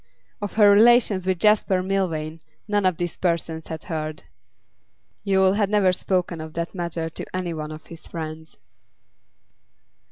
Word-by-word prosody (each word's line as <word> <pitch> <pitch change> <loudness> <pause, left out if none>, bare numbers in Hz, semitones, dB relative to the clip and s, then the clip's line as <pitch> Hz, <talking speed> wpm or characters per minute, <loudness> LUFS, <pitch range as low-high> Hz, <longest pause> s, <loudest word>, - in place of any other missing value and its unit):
Of 205 - -4
her 210 -2 +6
relations 215 -3 +5
with 185 -1 +1
Jasper 200 -2 +3
Milvain 165 -5 -2 0.3
none 205 -2 +2
of 185 -3 0
these 175 -1 -3
persons 165 -2 -2
had 160 -1 -6
heard; 155 -2 -5 1.0
Yule 190 -1 +3
had 205 -1 +1
never 200 -3 +3
spoken 180 -3 -1
of 155 0 -8
that 170 0 -3
matter 170 -3 -3
to - - -7
any 180 -2 -2
one 155 -1 -5
of 155 0 -10
his 165 -1 -12
friends. 160 -1 -7
180 Hz, 150 wpm, -23 LUFS, 160-195 Hz, 1.0 s, her